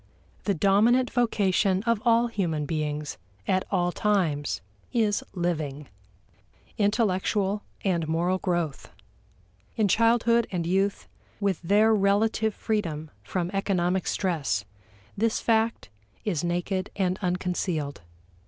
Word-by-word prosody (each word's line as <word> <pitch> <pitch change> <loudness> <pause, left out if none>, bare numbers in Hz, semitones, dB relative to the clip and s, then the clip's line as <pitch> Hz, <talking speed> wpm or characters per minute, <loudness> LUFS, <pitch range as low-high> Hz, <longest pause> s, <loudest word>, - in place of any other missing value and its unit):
The 200 - +1
dominant 220 +8 +3
vocation 200 -5 +2
of 230 -2 +1
all 235 0 +4
human 175 -10 -1
beings 150 - -3 0.3
at 185 0 +1
all 175 -2 +1
times 175 -9 0 0.3
is 215 -4 +1
living 155 -5 -2 0.9
intellectual 205 -1 +1 0.2
and 170 -4 +1
moral 175 +4 +1
growth. 175 -6 -2 0.9
In 215 -3 +2
childhood 230 +2 +3
and 175 -3 -2
youth, 195 +3 0 0.3
with 200 -4 0
their 210 +5 +4
relative 215 +1 +2
freedom 160 -8 -2
from 180 -1 -3
economic 190 -2 0
stress, 155 - -1 0.5
this 225 +2 +1
fact 225 - +1 0.4
is 175 -7 -1
naked 175 +2 -1
and 185 -1 0
unconcealed. 180 - -2
190 Hz, 105 wpm, -26 LUFS, 170-215 Hz, 0.9 s, all